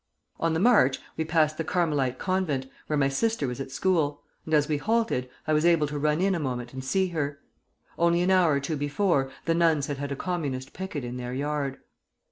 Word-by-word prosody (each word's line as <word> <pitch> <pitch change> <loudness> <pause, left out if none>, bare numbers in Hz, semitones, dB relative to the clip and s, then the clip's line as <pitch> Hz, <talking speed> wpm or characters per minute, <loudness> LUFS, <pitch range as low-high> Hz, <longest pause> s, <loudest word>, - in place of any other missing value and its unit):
"On 165 -1 +1
the - - +1
march 200 - +5 0.2
we 160 - -1
passed 155 -1 +1
the - - +1
Carmelite 150 -7 0
Convent, 185 -8 -1 0.2
where 150 - 0
my 135 -1 +3
sister 185 +5 0
was 125 +1 -4
at 135 - -6
school; 150 -2 0 0.2
and 160 - -4
as 150 -1 +3
we 150 - 0
halted, 220 - 0 0.2
I 155 - +1
was 155 0 +3
able 170 -3 +4
to 145 0 -4
run 150 +3 +1
in 195 0 +3
a 175 - -1
moment 125 -4 -4
and 130 0 -6
see 190 +8 +1
her. 145 -4 -2 0.6
Only 170 +1 +3
an 185 - +2
hour 180 -5 +4
or 140 - +2
two 145 +2 -3
before; 145 -1 +1 0.2
the 165 - +2
nuns 165 -4 +3
had 145 -1 -4
had 140 0 -4
a - - -1
Communist 140 -6 -3
picket 185 -7 -5
in 120 +1 -5
their 125 0 -5
yard. 145 -1 -2
150 Hz, 220 wpm, -27 LUFS, 140-170 Hz, 0.6 s, march